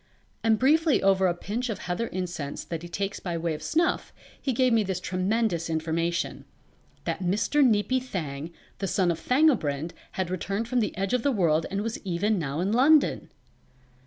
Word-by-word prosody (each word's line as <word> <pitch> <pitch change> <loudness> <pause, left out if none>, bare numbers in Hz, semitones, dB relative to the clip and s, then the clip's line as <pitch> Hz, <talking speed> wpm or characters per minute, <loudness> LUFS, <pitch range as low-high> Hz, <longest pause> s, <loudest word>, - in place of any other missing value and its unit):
And 225 -1 +4
briefly 305 +5 +3
over 190 -1 +4
a 175 - +2
pinch 230 +8 -3
of 220 - -2
heather 180 +6 -3
incense 175 -7 -4
that 165 -2 -5
he 175 - -8
takes 195 +2 -3
by 175 -2 -3
way 165 0 -1
of 150 - -6
snuff 335 +3 0 0.3
he 270 - 0
gave 255 0 +2
me 225 - +4
this 190 -2 -2
tremendous 185 -1 0
information: 165 +1 -1 0.6
that - - -3
Mr. 215 +11 +2
Neepy 250 +2 +3
Thang 160 - -5 0.3
the 195 - -1
son 180 -2 +2
of 165 - -3
Thangobrind 175 - +2 0.2
had 185 -2 -2
returned 195 +5 -2
from 250 0 +1
the 215 - -1
Edge 195 +2 -1
of 250 - +2
the 280 - +2
World 165 -8 +2
and 195 +1 -2
was 225 0 -3
even 200 +2 0
now 150 0 -2
in 190 +3 0
London. 275 +6 +4
195 Hz, 185 wpm, -27 LUFS, 170-235 Hz, 0.6 s, And